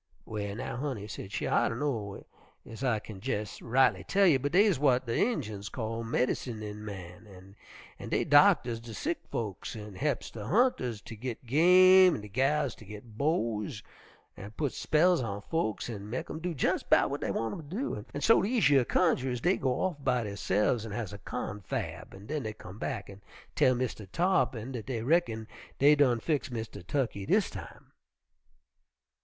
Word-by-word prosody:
"Well 100 -2 -4
now, 125 0 -5
honey," 125 -7 -4
said 100 -2 -8
she, 110 - -2
"I - - +2
dunno 115 -6 -3 0.4
ez 115 +4 -9
I 125 -4 +2
kin 105 -2 -10
jes' 110 -5 -3
rightly 125 +3 +3
tell 200 0 +3
you, 155 -7 +5
but 140 +2 -2
deys 200 -1 +5
w'at 130 -2 +3
de 115 - -2
Injuns 110 - -1
calls 115 -1 -4
'medincin' 110 -3 -2
men,' 95 0 -10 0.4
an' - - -7
dey - - +1
doctors 115 -2 +5
de 115 -1 -9
sick 330 +1 -2
folks 105 -2 -4
an' 105 -2 -8
he'ps 140 +6 -2
de 110 - -7
hunters 160 - +1
ter - - -9
git 120 +2 -6
game 180 +6 +7
an' 110 - -5
de 105 - -10
gals 135 +3 +1
ter 110 - -14
git 105 +2 -11
beaux, 115 -6 0 0.7
an' 100 0 -9
putts 145 -4 -1
spells 170 +1 +3
on 100 -4 -3
folks 110 -2 -2
an' 105 -3 -7
mek 125 - -4
'em 155 - -5
do 175 0 -3
jes' - - +1
'bout - - +3
w'at - - -3
dey - - -2
want 115 -1 -2
'em 150 -3 -8
to. 195 - -3
An' 145 - -5
so 225 - +5
dese 220 - +2
yer 135 -3 +5
cunjerers 130 -5 +1
dey 180 +10 +2
goes 130 - 0 0.2
off 145 -4 -15
by 125 -2 +1
derse'fs 105 +2 0
an' 110 -2 -6
has 105 -2 -4
a 100 - -8
confab 105 0 -5
an' 100 +1 -12
den 150 +5 -3
dey 110 -3 -4
come 100 -1 -11
back 120 -8 -4
an' 100 0 -12 0.3
tell 130 - +4
Mistah 120 -5 -3
Tarr'pin 130 - 0
dat 115 -5 -6
dey 115 -4 -3
reckon 120 -7 +1 0.3
dey 145 +2 +6
done 135 -5 +3
fix 150 +3 -1
Mistah 110 -4 -6
Tukkey 100 -1 -2
dis - - +2
time. - - -10
120 Hz, 185 wpm, -30 LUFS, 105-145 Hz, 0.7 s, game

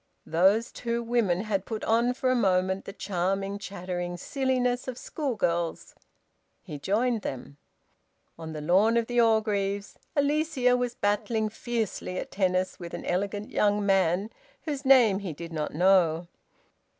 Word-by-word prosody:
Those 195 +8 +3
two 235 0 -3
women 225 -7 +1
had 205 -3 -1
put 220 0 -5
on 235 +3 +2
for 255 0 +1
a - - +2
moment 190 -3 +1
the - - -6
charming, 195 +1 -2
chattering 180 -3 -5
silliness 255 +2 -1
of 255 -2 -5
schoolgirls. 175 - -2 0.7
He 150 - -7
joined 225 - 0
them. 135 -1 -6 0.8
On 160 -1 -8
the 155 -1 -6
lawn 195 +9 +3
of 230 - +2
the 245 +1 +2
Orgreaves, 205 -3 0 0.2
Alicia 285 -3 +2
was 245 -1 -2
battling 215 +2 0
fiercely 220 -5 -3
at - - -5
tennis 185 -1 0
with 170 -1 -7
an - - -7
elegant 200 +3 -2
young 205 0 +2
man 195 +1 +2 0.3
whose 290 -3 -4
name 240 -7 +6
he 190 -5 -5
did 165 +2 -8
not 150 -1 -2
know. 175 -1 +3
205 Hz, 145 wpm, -27 LUFS, 180-235 Hz, 0.8 s, name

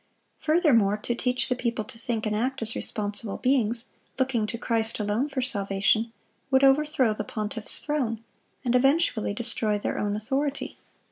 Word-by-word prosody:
Furthermore, 280 - +3
to 225 +3 -2
teach 250 +1 0
the 250 - +1
people 235 -3 -2
to 225 - -10
think 230 -2 -2
and 210 0 0
act 255 +3 -1
as 225 +1 0
responsible 205 -1 -2
beings, 240 -3 +1 0.3
looking 255 -5 +1
to 235 - -4
Christ 225 -1 -1
alone 210 +7 0
for 265 -2 -2
salvation, 200 0 +1 0.4
would 265 0 +4
overthrow 270 -4 +4
the 210 - -4
pontiff's 215 +1 -4
throne, 245 -7 -2 0.4
and 245 - +2
eventually 250 -5 +2
destroy 220 -2 0
their 205 - -2
own 205 0 0
authority. 270 +7 -2
230 Hz, 155 wpm, -26 LUFS, 215-265 Hz, 0.4 s, would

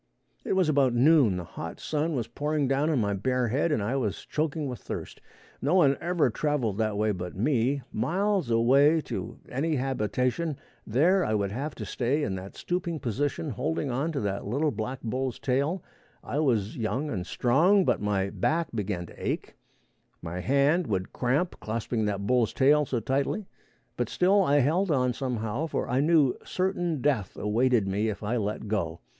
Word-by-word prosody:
It - - -1
was 190 -3 +3
about 135 -5 +3
noon. 130 - +5
The 90 - -4
hot 85 0 -7
sun 155 +1 -1
was 120 -3 -2
pouring 145 +3 -1
down 140 +4 +1
on 155 - +2
my 100 -4 +1
bare 125 +5 0
head 140 +7 +1
and 115 -9 +1
I 115 +6 -1
was 110 -7 -2
choking 155 -1 -2
with 125 -2 -5
thirst. - - -7 0.4
No 150 +7 +2
one 145 -7 +5
ever 170 -7 +1
traveled 120 -6 -1
that 110 -2 0
way 105 +1 +2
but 90 -2 -5
me. 130 +4 +1
Miles 185 - 0
away 135 +7 +4
to - - -5
any 155 +5 -1
habitation, 130 +4 -1 0.3
there 170 - +3
I 110 - 0
would 100 -2 0
have 140 +7 -4
to - - -6
stay 135 +5 0
in 100 - -1
that 95 +1 -7
stooping 175 -2 -2
position, 140 +5 -2
holding 140 +4 -2
on 140 +7 -1
to 140 - -1
that 100 -1 -2
little 145 +7 +1
black 120 +4 -4
bull's 130 +2 -2
tail. 140 +8 0 0.4
I 145 - -2
was 115 -9 +1
young 125 +6 -2
and 90 -4 -2
strong, 175 +11 +3
but - - +1
my 100 -2 0
back 165 -1 0
began 100 -5 -2
to - - -12
ache, - - -3 0.7
my 85 +1 -5
hand 140 - +2
would 95 -3 -2
cramp 140 +9 0
clasping 110 0 -2
that 100 -1 -2
bull's 120 -1 +2
tail 145 +2 +4
so 125 - -1
tightly, 140 - -1 0.5
but - - -1
still 195 +3 +3
I 145 -5 +3
held 175 +9 +1
on 125 -4 +2
somehow, 120 +2 -2
for - - -2
I 125 +2 +1
knew 150 -3 +3
certain 175 -5 -1
death 125 -10 0
awaited 115 0 +2
me 105 +3 0
if 105 - -5
I 115 +4 0
let 105 0 -3
go. 85 -6 -2
130 Hz, 185 wpm, -27 LUFS, 110-150 Hz, 0.7 s, noon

